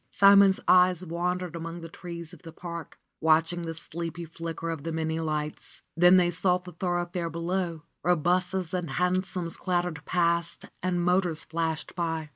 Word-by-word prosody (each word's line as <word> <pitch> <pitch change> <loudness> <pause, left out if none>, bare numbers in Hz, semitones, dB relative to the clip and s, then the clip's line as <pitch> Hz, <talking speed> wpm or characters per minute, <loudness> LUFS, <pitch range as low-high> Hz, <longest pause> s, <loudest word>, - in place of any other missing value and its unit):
Simon's 200 -1 +6
eyes 180 -1 +5
wandered 180 +1 -2
among 165 +1 -6
the 165 - -7
trees 170 0 -8
of 175 - -13
the 165 - -10
park, 170 -2 -8 0.2
watching 165 +2 +3
the 165 - -4
sleepy 170 +1 -3
flicker 165 0 -5
of 160 -3 -5
the 165 - -3
many 160 0 -1
lights. 155 -1 -4
Then 175 +2 +7
they 175 -1 +3
sought 180 +1 +1
the 180 - -9
thoroughfare 175 0 -2
below, 170 0 -2 0.2
where 180 +1 +3
busses 180 +2 0
and 180 -3 -2
hansoms 180 0 -1
clattered 175 -4 -1
past 170 -1 0 0.2
and 175 -1 0
motors 180 -3 +1
flashed 160 -1 -3
by. 165 -3 -2
170 Hz, 160 wpm, -28 LUFS, 165-180 Hz, 0.2 s, Then